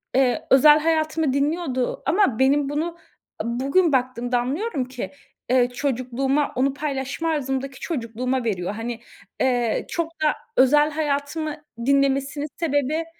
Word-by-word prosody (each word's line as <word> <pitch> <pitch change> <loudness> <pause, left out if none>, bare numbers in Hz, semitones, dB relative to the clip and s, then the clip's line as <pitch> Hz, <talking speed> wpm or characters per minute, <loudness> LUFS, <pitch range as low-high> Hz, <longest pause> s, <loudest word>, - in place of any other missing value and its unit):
eee, 260 -2 +2
özel 295 +3 +7
hayatımı 315 -2 +1
dinliyordu 280 -3 -1
ama 325 - +2
benim 275 +1 +3
bunu, 325 +4 -2 0.5
bugün 275 +9 +1
baktığımda 245 -1 0
anlıyorum 280 - -2
ki, 255 -1 -6 0.4
eee, 245 -1 +4
çocukluğuma, 265 +2 -1
onu 265 +1 +1
paylaşma 285 +2 -3
arzımdaki 270 -3 -2
çocukluğuma 250 -3 -2
veriyor. 200 -4 -2
Hani, 230 +1 -5 0.4
eee, 245 -3 +1
çok 335 -1 -4
da 300 - +4 0.2
özel 295 +4 +5
hayatımı 300 0 -2 0.3
dinlemesinin 275 +1 +1
sebebi, 305 0 0
275 Hz, 120 wpm, -23 LUFS, 255-300 Hz, 0.5 s, özel